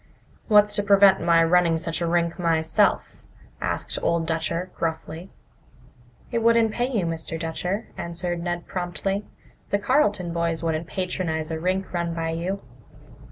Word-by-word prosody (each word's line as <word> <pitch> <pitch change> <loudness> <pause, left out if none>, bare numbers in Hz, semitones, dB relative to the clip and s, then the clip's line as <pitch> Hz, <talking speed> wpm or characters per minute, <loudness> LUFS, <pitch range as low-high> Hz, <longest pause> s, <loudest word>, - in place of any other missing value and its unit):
"What's 210 -1 +5
to - - +3
prevent 200 -1 +5
my 165 -1 +4
running 170 0 +3
such 165 0 -3
a 170 - 0
rink 170 +1 0
myself?" 160 -2 +1 0.4
asked - - -2
Old 170 -1 +1
Dutcher 165 +2 -2
gruffly. 165 +2 -4 1.0
"It 235 - +1
wouldn't 230 -1 +4
pay 240 +3 -1
you, 215 -9 0
Mr. 165 0 -3
Dutcher," 180 +6 -3
answered 175 0 -3
Ned 175 0 -3
promptly. 195 +3 -3 0.4
"The 200 - +2
Carleton 205 - +1
boys 170 -1 -1
wouldn't 160 0 -1
patronize 165 -4 -2
a 160 - -2
rink 185 +3 -1
run 170 -1 -2
by 165 -1 -2
you." 180 +4 -3
175 Hz, 145 wpm, -24 LUFS, 165-195 Hz, 1.0 s, What's